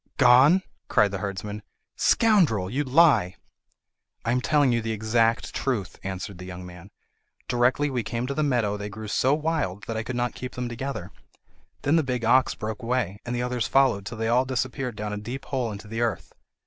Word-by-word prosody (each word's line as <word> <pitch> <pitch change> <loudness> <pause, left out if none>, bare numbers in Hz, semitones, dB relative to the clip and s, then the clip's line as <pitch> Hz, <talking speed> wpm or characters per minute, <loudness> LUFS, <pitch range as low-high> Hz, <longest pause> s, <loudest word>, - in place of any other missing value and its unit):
"G - - -40
g - - -43
gone?" 135 +9 +6 0.2
cried 105 -1 +3
the 100 - -3
herdsman. 105 +1 -5 0.3
"Scoundrel, 165 - +3
you 140 +4 0
lie!" 135 - +4 0.9
"I 115 - +1
am 125 +1 +1
telling 145 -1 +3
you 115 -1 +1
the 110 0 -2
exact 115 +2 +1
truth," 115 -9 -2
answered 95 0 -5
the 90 - -8
young 90 0 -8
man. 90 +1 -12 0.6
"Directly 130 +4 +2
we 125 -2 0
came 115 +3 -3
to 140 - -3
the 155 - -1
meadow 120 -8 +1
they 105 0 -5
grew 110 +1 -8
so 130 +6 +2
wild 150 - -2
that 115 +2 -4
I - - -1
could 120 +3 -5
not 120 0 -1
keep 125 0 -7
them 125 -1 -3
together. 120 -6 -5 0.7
Then 150 +4 +3
the 160 - +3
big 125 -3 -2
ox 130 +3 +4
broke 110 0 -5
away, 115 -4 -1
and 120 - -2
the 120 - -1
others 125 -2 -1
followed 125 -8 +2
till 115 - -6
they 110 0 -1
all 120 +3 +3
disappeared 130 -1 -3
down 105 0 -4
a - - -3
deep 120 +6 -6
hole 125 -5 -2
into 105 +1 -8
the 115 +2 -4
earth. 110 -8 -2
120 Hz, 210 wpm, -25 LUFS, 105-130 Hz, 0.9 s, gone